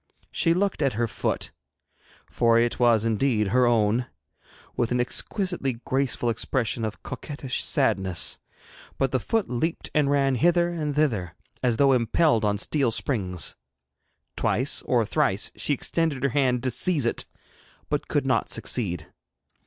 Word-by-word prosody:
She 165 -1 +2
looked 195 -2 0
at 135 -4 +2
her 115 +2 0
foot - - -3 0.8
for 115 -1 +2
it 120 0 +1
was 115 -3 +4
indeed 110 -2 +1
her 125 +3 +3
own 115 +1 +2 0.7
with 120 -1 -1
an 125 - +1
exquisitely 175 - -1
graceful 130 -3 0
expression 115 0 -2
of 110 -1 -5
coquettish 130 +1 -4
sadness, 95 -3 +1 0.6
but 135 -1 0
the 130 - +1
foot 220 - -1
leaped 160 +7 -3
and 150 -2 +2
ran 140 -1 +2
hither 170 +6 +3
and 150 -4 -3
thither, 105 - 0 0.3
as 120 -3 +1
though 140 -1 +4
impelled 120 +1 +2
on 105 -1 +1
steel 135 +4 +1
springs. 95 - -1 0.8
Twice - - +1
or - - +2
thrice - - 0
she - - 0
extended 160 -6 -1
her 140 - +3
hand 130 -2 +1
to 130 - 0
seize 145 +2 +2
it, 115 - +1 0.6
but - - -2
could - - 0
not - - +1
succeed. 90 -9 -1
125 Hz, 145 wpm, -25 LUFS, 115-145 Hz, 0.8 s, was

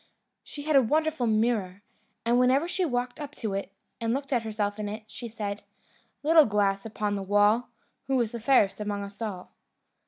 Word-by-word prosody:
She 290 - -9
had 310 0 +1
a 270 - +8
wonderful 305 +1 +1
mirror, 215 -4 0 0.4
and 240 +1 +3
whenever 260 +6 +3
she 370 +1 0
walked 245 -3 -2
up 290 -1 -7
to 215 -4 -3
it, 195 0 -3 0.3
and 230 +1 0
looked 275 0 -3
at 240 - +2
herself 215 -2 -2
in 210 -1 -3
it, 215 +1 -6
she 235 +2 -8
said: 210 -2 -4 0.6
"Little 315 -1 +6
glass 200 0 +1
upon 210 -1 -2
the 200 - -2
wall, 205 +5 +3 0.4
Who 265 -1 +2
is 230 -3 0
fairest 230 -4 +2
among 205 -1 -3
us 200 +2 -10
all?" 195 -5 -5
225 Hz, 185 wpm, -27 LUFS, 205-260 Hz, 0.6 s, a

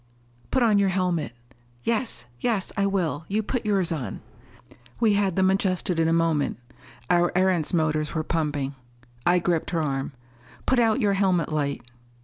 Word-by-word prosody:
"Put 255 - +2
on 215 -3 +4
your 200 -1 +3
helmet." 180 -8 -1 0.5
"Yes 225 - -1
yes, 215 - 0
I 200 -1 +2
will. 175 -6 -1
You 215 +2 0
put 230 0 -3
yours 195 -4 +1
on." 130 -11 -4 0.8
We 220 -3 +4
had 200 -3 +1
them 190 0 +3
adjusted 185 -3 0
in 165 - +3
a - - +2
moment. 165 -3 +1 0.5
Our 175 0 +3
Erentz 185 -4 +2
motors 155 -2 0
were 160 - 0
pumping. 150 -4 -1 0.5
I 175 +1 +5
gripped 175 -2 0
her. 145 -6 -1 0.5
"Put 260 - +3
out 230 +2 +3
your 205 -2 +3
helmet 185 -5 +1
light." 140 -2 -1
180 Hz, 155 wpm, -25 LUFS, 155-200 Hz, 0.8 s, I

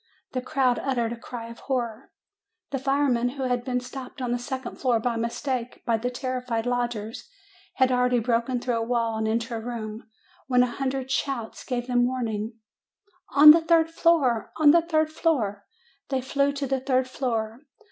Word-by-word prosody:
The 255 - -2
crowd 255 -2 +1
uttered 240 -4 -1
a - - -5
cry 235 0 -8
of 230 - -11
horror. 245 -2 -3 0.6
The 270 - -1
firemen, 270 -3 +1
who 270 - -2
had 245 -1 0
been 250 -1 -1
stopped 255 +2 -9
on 250 -2 -2
the 245 - 0
second 260 0 -5
floor 245 -4 +2
by 235 +1 -1
mistake 235 +2 -3
by 230 -1 +2
the 245 +3 -2
terrified 250 -2 -3
lodgers, 240 - -3 0.5
had 260 -1 +3
already 250 0 +3
broken 240 +2 0
through 245 -1 -1
a - - -1
wall 230 -1 0
and 220 - 0
into 230 +2 -1
a 230 - -2
room, 220 -1 -6 0.4
when 250 -1 +4
a 240 -2 -3
hundred 265 -1 -2
shouts 265 -5 -2
gave 245 -1 -3
them 245 -1 +2
warning: 225 -3 -3 0.4
" 370 -3 -38
'On 300 +2 +11
the 330 +2 +5
third 325 0 +3
floor! 305 -9 +2
On 305 -2 +7
the 340 +2 +5
third 315 -2 +1
floor!' 235 - -1 0.4
"They 265 -1 0
flew 280 +2 +1
to 280 0 -3
the 270 0 0
third 260 -1 +1
floor. 240 0 -3
250 Hz, 185 wpm, -26 LUFS, 235-270 Hz, 0.6 s, On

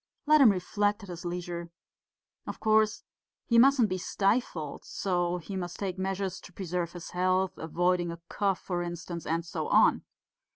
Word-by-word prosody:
Let 305 0 +6
him 255 - +9
reflect 205 +3 0
at 200 - -10
his 175 0 -7
leisure. 175 -1 -4 0.8
Of - - -6
course 215 0 +2 0.4
he 235 -1 +4
mustn't 265 -2 +6
be 185 -1 -2
stifled, 195 - -1
and - - -23
so 175 -2 -1
he 185 +3 -7
must 175 -2 -4
take 190 -2 -4
measures 190 0 -2
to - - -13
preserve 175 -2 -3
his 175 -2 -8
health, 185 +1 +1
avoiding 175 +2 0
a 170 - -6
cough, 195 -3 0
for 175 -2 -2
instance, 170 -1 -6
and 165 +1 -1
so 170 - -4
on.... - - +4
185 Hz, 170 wpm, -29 LUFS, 175-200 Hz, 0.8 s, him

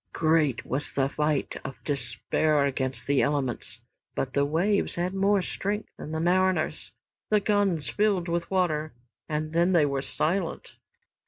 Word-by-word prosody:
Great 155 -6 +2
was 140 +3 -1
that 135 0 +1
fight 150 -2 0
of 135 - -7
despair 140 +3 0
against 130 -1 -2
the 140 -1 +3
elements. 140 -4 -1 0.3
But 130 -1 -2
the 140 0 +2
waves 180 +8 +1
had 180 +2 -1
more 195 0 +2
strength 205 +4 -3
than 155 - -8
the 160 - -2
mariners. 185 +2 +1 0.4
The 215 - +4
guns 200 -8 +1
filled 200 -4 +1
with 170 0 -2
water 155 -5 0 0.4
and 155 +1 -2
then 170 +3 +3
they 165 -4 +5
were 140 -1 -1
silent. 170 +5 -2
160 Hz, 150 wpm, -27 LUFS, 140-185 Hz, 0.4 s, they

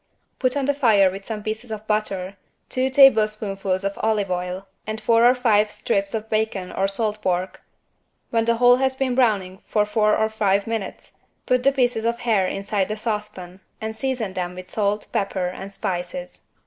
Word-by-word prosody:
Put 255 +1 +1
on 275 - 0
the 285 - +2
fire 215 -9 +4
with 195 +1 -8
some 215 -2 -5
pieces 220 +3 -4
of 215 -1 -6
butter, 200 -3 -2 0.3
two 260 +1 0
tablespoonfuls 215 -7 +3
of 195 0 -3
olive 210 -3 0
oil 180 +1 -3 0.2
and 215 0 -3
four 230 +2 +3
or 250 - +3
five 215 -4 +3
strips 200 0 -1
of 220 0 -4
bacon 215 -4 -1
or 195 - 0
salt 210 +1 -1
pork, 185 0 -2 0.7
when 230 -1 +1
the 235 0 +3
whole 245 +1 +5
has 265 0 +1
been 260 -1 0
browning 205 -6 +1
for 210 -1 +2
four 210 0 +2
or 220 - +2
five 205 -2 +1
minutes, 225 -4 -5 0.3
put 255 0 +2
the 275 - +4
pieces 245 -4 +1
of 235 +1 -1
hare 210 -6 +2
inside 195 0 -1
the 215 - -4
saucepan 210 -5 -5 0.2
and 220 0 -5
season 240 -5 -2
them 180 -1 -4
with 185 0 -10
salt, 210 0 0
pepper 195 -2 -1
and 190 +2 -8
spices. 195 +9 -5
215 Hz, 185 wpm, -23 LUFS, 195-230 Hz, 0.7 s, whole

